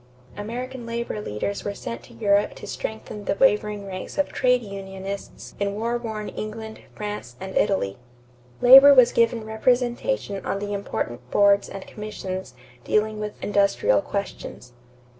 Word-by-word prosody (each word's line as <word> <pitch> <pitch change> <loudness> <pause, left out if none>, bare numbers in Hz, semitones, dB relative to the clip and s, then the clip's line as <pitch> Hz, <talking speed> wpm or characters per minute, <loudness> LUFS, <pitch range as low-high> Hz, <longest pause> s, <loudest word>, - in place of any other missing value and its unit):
American 240 +3 -6
labor 230 -2 -3
leaders 200 - -3
were 200 0 -3
sent 115 -9 -6
to 120 - -16
Europe 205 -2 +2
to - - -9
strengthen 215 -1 -6
the - - 0
wavering 210 -3 +2
ranks 185 -1 -7
of 290 - +1
trade 250 -1 +3
unionists 195 -1 -7
in 200 0 -1
war 230 +3 -1
worn 220 -3 -5
England, 220 +1 -6 0.2
France, 205 -13 -6
and 190 0 -7
Italy. 125 - +1 0.6
Labor 270 +3 +10
was 255 -2 +7
given 230 -1 +2
representation 240 - 0
on - - -2
the 205 +1 -4
important 125 -11 -4
boards 200 +3 +4
and 195 -1 -8
commissions 190 - -6 0.3
dealing 215 0 +1
with 210 0 -5
industrial 200 - +3
questions. 200 -10 -6
210 Hz, 140 wpm, -24 LUFS, 195-230 Hz, 0.6 s, Labor